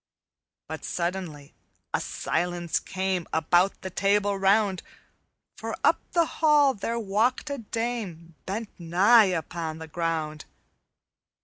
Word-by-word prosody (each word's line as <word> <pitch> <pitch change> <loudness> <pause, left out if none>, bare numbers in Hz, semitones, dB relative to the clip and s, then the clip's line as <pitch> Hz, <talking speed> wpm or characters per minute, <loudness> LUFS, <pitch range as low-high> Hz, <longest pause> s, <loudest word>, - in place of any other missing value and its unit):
"But 160 -2 -6
suddenly 170 -5 -4 0.4
a - - +1
silence 175 -1 -1
came 190 -2 -2
About 175 +4 +2
the 190 - -6
Table 200 +1 +2
Round, 195 0 +2 0.7
For - - -5
up - - +4
the 340 -1 +4 0.2
hall 295 -3 +5
there 230 +2 -3
walked 230 +7 0
a 280 - -3
dame 220 -8 -4
Bent 210 +3 -3
nigh 190 +5 +5
unto 160 0 -5
the 160 0 -8
ground. 155 -2 -3
190 Hz, 115 wpm, -26 LUFS, 165-220 Hz, 0.7 s, hall